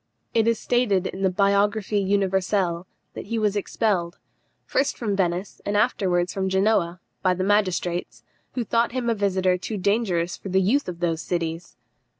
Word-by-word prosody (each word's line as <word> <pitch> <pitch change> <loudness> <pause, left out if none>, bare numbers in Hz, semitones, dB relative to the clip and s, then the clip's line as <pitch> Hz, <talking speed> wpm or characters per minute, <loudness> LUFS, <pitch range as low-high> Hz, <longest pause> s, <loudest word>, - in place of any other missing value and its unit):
It 225 -1 +3
is 230 -1 +3
stated 215 -7 +1
in 190 - -5
the 190 - +3
Biographie 200 +2 +2
Universelle 190 -2 0 0.3
that - - -8
he 230 - -2
was 210 -2 +1
expelled, 195 -4 -1 0.5
first 275 +2 0
from 210 -4 -1
Venice, 180 0 -2
and 205 0 0
afterwards 185 -6 +1
from 190 -1 -1
Genoa, 190 -3 +1 0.2
by 185 -1 +2
the 185 - -2
magistrates, 185 -3 0 0.3
who 250 - -1
thought 230 +2 +1
him 245 -2 0
a - - +3
visitor 190 -3 +1
too 210 +4 -4
dangerous 185 -4 0
for 195 - -8
the 190 +1 +3
youth 220 +6 +1
of 175 0 -7
those 165 -1 0
cities. 170 -1 -4
195 Hz, 165 wpm, -24 LUFS, 180-210 Hz, 0.5 s, It